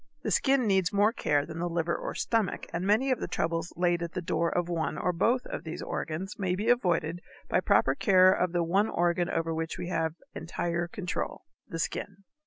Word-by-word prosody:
The - - -1
skin 270 -2 +3
needs 190 -3 +2
more 205 +2 +3
care 145 - +1
than 160 0 -7
the 175 +1 -1
liver 170 0 0
or - - -4
the - - -6
stomach, 225 -4 0
and 175 +3 -2
many 235 +6 +3
of 255 - +1
the - - -3
troubles 165 -1 -2
laid 175 -1 +2
at 170 0 -4
the - - -2
door 170 0 0
of 175 -1 -1
one 165 -3 -2
or 180 - 0
both 235 +9 +1 0.2
these 160 -1 -6
organs 180 +7 -4
may 185 -2 0
be 210 +5 -1
avoided 175 -8 +1 0.3
by - - +2
proper - - +3
care 185 -3 +5
of 180 -1 0
the 175 -1 +1
one 195 +6 +2
organ 175 0 +1
over 165 0 -1
which 160 0 -3
we 175 0 -5
have 160 -2 -1 0.2
entire 170 +1 -2
control, 180 +1 -4 0.2
the 165 - -4
skin. 195 +3 -4
175 Hz, 210 wpm, -29 LUFS, 165-195 Hz, 0.3 s, care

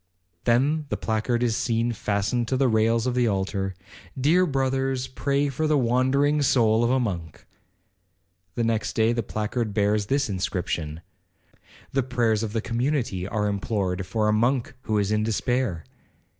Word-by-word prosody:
Then 140 +6 +2
the - - -1
placard 115 +2 -1
is 115 -2 +1
seen 115 0 0
fastened 110 +2 -1
to 130 - 0
the 135 0 +3
rails 115 0 +2
of 125 - 0
the 125 -1 +2
altar, 95 -1 -1 0.4
'Dear 170 +7 +4
brothers, 135 -2 0
pray 140 +2 0
for 150 +3 -1
the 155 -1 +3
wandering 135 +4 +2
soul 115 -5 +3
of 120 - +2
a 130 +1 +3
monk.' 90 -9 -4 1.1
The 120 - 0
next 110 -2 0
day 110 +1 +2
the 120 - 0
placard 110 +1 -3
bears 105 0 +1
this 140 +3 +1
inscription, 90 -5 -3 0.9
'The 135 - +1
prayers 120 -4 +1
of 110 -2 -3
the 115 - 0
community 115 -6 -1
are 105 0 -1
implored 95 -2 -2
for 110 -2 0
a 105 - +3
monk 120 +4 +1
who 110 -4 -1
is 100 0 0
in 105 0 +2
despair.' 110 -4 -1
115 Hz, 160 wpm, -25 LUFS, 105-130 Hz, 1.1 s, Dear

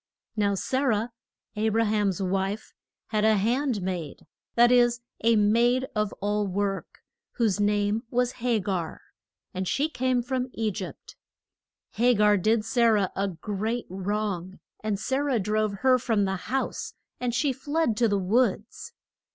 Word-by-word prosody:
Now 205 -2 +1
Sa 260 +7 -1
rah 230 -5 +1 0.5
A 215 +1 +1
bra 225 +1 +2
ham's 205 -4 +1
wife, 195 +2 -2 0.4
had 215 -1 0
a 220 0 +5
hand 235 +1 0
maid 175 -6 -4 0.3
that 240 +1 +6
is, 240 -1 +4 0.2
a 230 0 +5
maid 235 +5 +3
of 210 -1 0
all 205 0 0
work 195 +1 -3 0.3
whose 220 -5 +1
name 205 +1 +1
was 250 0 +1
Ha 240 -1 +1
gar; 185 -5 -3 0.5
and 185 0 -3
she 290 - +1
came 255 -4 0
from 255 +1 -2
E 220 -1 -1
gypt. 190 -1 -8 0.8
Ha 245 +1 +5
gar 210 0 +5
did 215 +3 +1
Sa 235 +1 +3
rah 210 -4 +3
a 195 +1 0
great 210 +6 -3
wrong, 190 -1 -3 0.2
and 210 -2 -1
Sa 265 +4 -1
rah 280 -3 +1
drove 215 +1 0
her 255 -1 +6
from 220 -4 +1
the 190 0 -1
house, 270 - -2 0.2
and 250 -1 -1
she 275 +2 +1
fled 285 -1 0
to 235 - +3
the 205 -2 +1
woods. 215 +3 0
215 Hz, 160 wpm, -26 LUFS, 200-245 Hz, 0.8 s, that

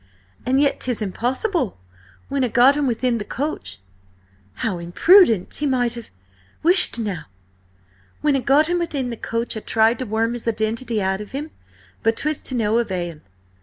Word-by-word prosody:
And 260 +2 +3
yet 285 -1 +2
'tis 250 -3 -1
impossible. 250 - -1 0.5
When 275 -1 -1
I - - +2
got 245 +5 +5
him 290 -2 0
within 240 0 0
the - - -3
coach—" 205 - -4 0.9
"How 195 -6 -1
imprudent! 220 - +4
He 295 - -1
might 245 -3 +1
have—" 235 -2 -7 0.5
"Whisht 355 -5 +4
now! 200 -9 -4 1.0
When 295 -2 +2
I - - +2
got 280 +4 +4
him 350 +1 0
within 285 -7 -2
the - - -4
coach 230 +1 -3
I - - -3
tried 225 +2 +2
to 255 - -4
worm 225 +2 0
his 240 -1 -7
identity 220 0 -1
out 190 +1 -1
of 210 - -10
him, 300 +3 -5 0.5
but 225 0 +1
'twas 305 0 -1
to 260 - -3
no 225 -1 +2
avail. 175 -7 -3
240 Hz, 170 wpm, -21 LUFS, 220-275 Hz, 1.0 s, got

